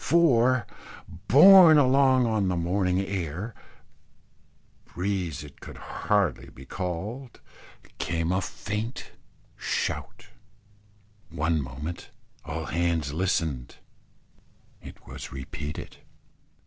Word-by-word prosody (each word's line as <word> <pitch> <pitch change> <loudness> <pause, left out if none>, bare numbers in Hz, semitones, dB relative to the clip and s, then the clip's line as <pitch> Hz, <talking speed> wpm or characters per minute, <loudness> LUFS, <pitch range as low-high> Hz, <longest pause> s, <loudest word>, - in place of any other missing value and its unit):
For, 130 -8 +3 0.6
borne 170 +2 +9
along 130 -2 +4
on 110 -4 0
the 90 - 0
morning 90 +2 0
air 95 +3 -4 1.3
breeze 90 -5 -3
it 75 - -14
could - - -10
hardly 100 -5 -1
be 65 - -14
called 100 - -5 0.6
came 85 0 -1
a 95 +1 +1
faint 105 +5 -5 0.4
shout. - - -3 1.0
One 80 0 0
moment 70 +6 -7 0.3
all 80 +1 -5
hands 85 -4 -1
listened: 80 -7 -1 1.1
it - - -13
was - - -9
repeated. 70 +3 -7
90 Hz, 90 wpm, -26 LUFS, 80-115 Hz, 1.3 s, borne